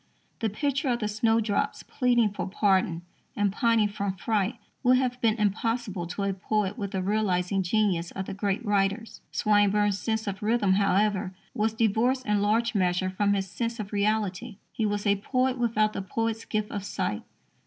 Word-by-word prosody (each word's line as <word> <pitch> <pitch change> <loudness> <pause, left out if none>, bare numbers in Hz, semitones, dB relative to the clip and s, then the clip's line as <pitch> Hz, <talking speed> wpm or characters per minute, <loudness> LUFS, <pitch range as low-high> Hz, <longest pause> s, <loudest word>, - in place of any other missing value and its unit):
The 225 - 0
picture 275 +6 -1
of 240 - +2
the 215 -3 -2
snowdrops 225 +3 0
pleading 240 -4 +2
for 200 - -4
pardon 190 -3 +1 0.3
and 205 -1 +1
pining 230 -2 +3
from 200 -1 -3
fright 215 +2 0 0.3
would 255 0 +5
have 250 -1 -1
been 220 -2 +3
impossible 210 -3 -1
to 180 +4 -4
a 195 0 0
poet 200 +1 -1
with 205 -5 -4
the 190 -1 -2
realizing 195 -2 +1
genius 185 -3 +1
of 190 - -5
the - - -5
great 200 +3 -2
writers. 205 +2 0
Swinburne's 205 -1 +2
sense 220 -1 -1
of 200 0 -4
rhythm, 210 -3 +2
however, 195 -1 +1 0.2
was 220 -1 0
divorced 235 +4 +1
in 210 -1 +1
large 225 +3 +2
measure 185 -2 +1
from 200 +2 +1
his 195 -1 -2
sense 230 +4 -3
of 210 0 -6
reality. 210 +1 -1
He 220 - -1
was 205 0 -2
a 200 -1 +3
poet 255 +4 0
without 215 -3 +1
the - - -3
poet's 225 +3 -2
gift 215 -1 -2
of 205 - -4
sight. 185 - -2
210 Hz, 175 wpm, -27 LUFS, 195-225 Hz, 0.3 s, would